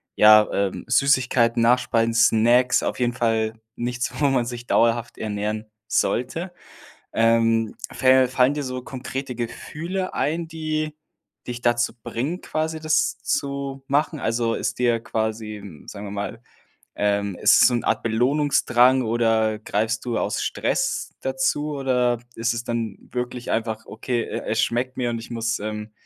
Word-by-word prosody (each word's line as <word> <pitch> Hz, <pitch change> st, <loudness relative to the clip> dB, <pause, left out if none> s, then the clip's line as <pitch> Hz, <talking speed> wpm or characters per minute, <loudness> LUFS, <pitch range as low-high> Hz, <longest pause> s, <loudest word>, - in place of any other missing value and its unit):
ja, 110 Hz, 0 st, +7 dB
ähm, 100 Hz, -1 st, -1 dB
Süßigkeiten, 125 Hz, -2 st, +3 dB
Nachspeisen, 115 Hz, -1 st, +2 dB
Snacks, 120 Hz, +3 st, +4 dB
auf -, -, -2 dB
jeden 120 Hz, -1 st, +1 dB
Fall 115 Hz, -2 st, 0 dB, 0.2 s
nichts, 120 Hz, 0 st, -2 dB
wo 145 Hz, -, +4 dB
man 130 Hz, -3 st, +2 dB
sich 120 Hz, 0 st, -7 dB
dauerhaft 115 Hz, 0 st, +1 dB
ernähren 105 Hz, 0 st, -3 dB, 0.2 s
sollte. 165 Hz, +9 st, -1 dB, 0.6 s
Ähm, 115 Hz, -1 st, +2 dB, 0.2 s
fä 130 Hz, -1 st, +4 dB
fallen 130 Hz, +2 st, +3 dB
dir 145 Hz, -, -3 dB
so 130 Hz, -1 st, -4 dB
konkrete 130 Hz, 0 st, -5 dB
Gefühle 170 Hz, +10 st, -4 dB
ein, 165 Hz, +2 st, -1 dB
die 155 Hz, -1 st, -3 dB, 0.5 s
dich 120 Hz, -1 st, -5 dB
dazu 120 Hz, 0 st, +1 dB
bringen, 150 Hz, +10 st, -3 dB
quasi 160 Hz, 0 st, -3 dB
das 155 Hz, 0 st, +1 dB
zu 140 Hz, -1 st, -3 dB
machen? 150 Hz, +3 st, +1 dB
Also, 115 Hz, -1 st, 0 dB
ist -, -, -3 dB
dir 120 Hz, -2 st, +2 dB
quasi, 110 Hz, -1 st, -3 dB
hm, 95 Hz, -7 st, -12 dB
sagen 105 Hz, 0 st, -7 dB
wir -, -, -6 dB
mal, 100 Hz, +3 st, -5 dB, 0.6 s
ähm 100 Hz, -2 st, 0 dB
ist -, -, +5 dB
es -, -, +8 dB
so 125 Hz, -, -1 dB
'n 120 Hz, -, -1 dB
Art -, -, +1 dB
Belohnungsdrang 130 Hz, +1 st, +3 dB
oder 110 Hz, -1 st, +1 dB
greifst 110 Hz, +1 st, -1 dB
du 120 Hz, -2 st, -1 dB
aus -, -, -1 dB
Stress -, -, -1 dB
dazu 265 Hz, -, -1 dB
oder 125 Hz, -3 st, +1 dB, 0.2 s
ist 115 Hz, +1 st, 0 dB
es 115 Hz, 0 st, -4 dB
dann 115 Hz, -4 st, -3 dB, 0.2 s
wirklich 125 Hz, 0 st, -4 dB
einfach: 110 Hz, -1 st, -2 dB
„Okay, 120 Hz, +2 st, -2 dB
e -, -, -5 dB
es 110 Hz, -, +1 dB
schmeckt 125 Hz, +2 st, -1 dB
mir 120 Hz, -2 st, -1 dB
und 115 Hz, -, -2 dB
ich 115 Hz, -, -10 dB
muss, 115 Hz, -1 st, -1 dB
ähm, 105 Hz, 0 st, -5 dB
120 Hz, 155 wpm, -23 LUFS, 115-130 Hz, 0.6 s, es